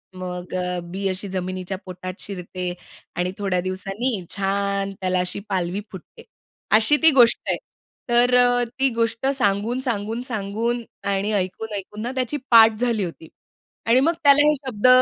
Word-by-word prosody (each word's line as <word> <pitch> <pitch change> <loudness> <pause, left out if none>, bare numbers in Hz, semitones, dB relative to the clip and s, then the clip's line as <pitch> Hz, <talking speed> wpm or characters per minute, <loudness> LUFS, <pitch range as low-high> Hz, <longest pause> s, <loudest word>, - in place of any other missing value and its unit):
मग 180 -1 -6
अ, 180 -1 -2
बी 190 +3 -4
अशी 190 +2 -4
जमिनीच्या 185 0 -4
पोटात 185 0 -7
शिरते 180 -2 -5 0.4
आणि 180 +1 -1
थोड्या 195 -3 0
दिवसांनी 195 +3 -3
छान 200 0 -1
त्याला 185 -1 +1
अशी 180 +2 -1
पालवी 185 0 -1
फुटते. 190 -3 -12 0.5
अशी 220 +7 +5
ती 320 - +9
गोष्ट 245 -4 +5
आहे. - - +1 0.5
तर 245 +1 +4
अ, 245 0 +4 0.2
ती 270 0 +4
गोष्ट 230 +2 -1
सांगून, 230 -2 +1
सांगून, 230 -3 -2
सांगून 225 +2 -2 0.3
आणि 200 +2 0
ऐकून, 205 +3 -2
ऐकून 205 +2 -7
ना 240 +2 -3
त्याची 260 +2 -1
पाठ 225 -1 +7
झाली 235 -4 +1
होती 165 -2 -7 0.6
आणि 235 +3 +5
मग 320 +6 +3
त्याला 290 +1 +6
हे 300 - +5
शब्द 255 -5 -1
205 Hz, 155 wpm, -22 LUFS, 185-240 Hz, 0.6 s, ती